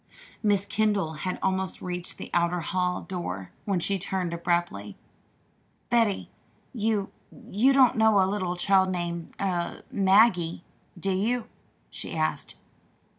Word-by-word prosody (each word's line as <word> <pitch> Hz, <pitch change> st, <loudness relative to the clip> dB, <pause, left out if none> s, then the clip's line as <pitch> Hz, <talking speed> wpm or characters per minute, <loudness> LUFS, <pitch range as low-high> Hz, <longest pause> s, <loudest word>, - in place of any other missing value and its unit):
Miss 205 Hz, -2 st, +2 dB
Kendall 205 Hz, -5 st, +1 dB
had 180 Hz, +4 st, -3 dB
almost 190 Hz, 0 st, -1 dB
reached 180 Hz, -1 st, -4 dB
the -, -, -8 dB
outer 170 Hz, 0 st, +2 dB
hall 180 Hz, +1 st, -1 dB
door 95 Hz, -, -5 dB
when 195 Hz, -3 st, +1 dB
she 195 Hz, +3 st, 0 dB
turned 180 Hz, -1 st, -2 dB
abruptly. 170 Hz, -, -1 dB, 0.9 s
"Betty, 225 Hz, -4 st, +2 dB, 0.5 s
you 215 Hz, -4 st, 0 dB, 0.4 s
you 240 Hz, +7 st, +4 dB
don't 265 Hz, -3 st, +5 dB
know 220 Hz, -2 st, +5 dB
a 190 Hz, -, +5 dB
little 185 Hz, -2 st, -1 dB
child 190 Hz, +1 st, +3 dB
named 170 Hz, -2 st, -4 dB
er 175 Hz, -3 st, -2 dB
'Maggie'; 190 Hz, -4 st, +4 dB, 0.4 s
do 195 Hz, +3 st, -1 dB
you?" 220 Hz, +6 st, 0 dB, 0.4 s
she -, -, -6 dB
asked. -, -, -1 dB
190 Hz, 125 wpm, -27 LUFS, 175-205 Hz, 0.9 s, don't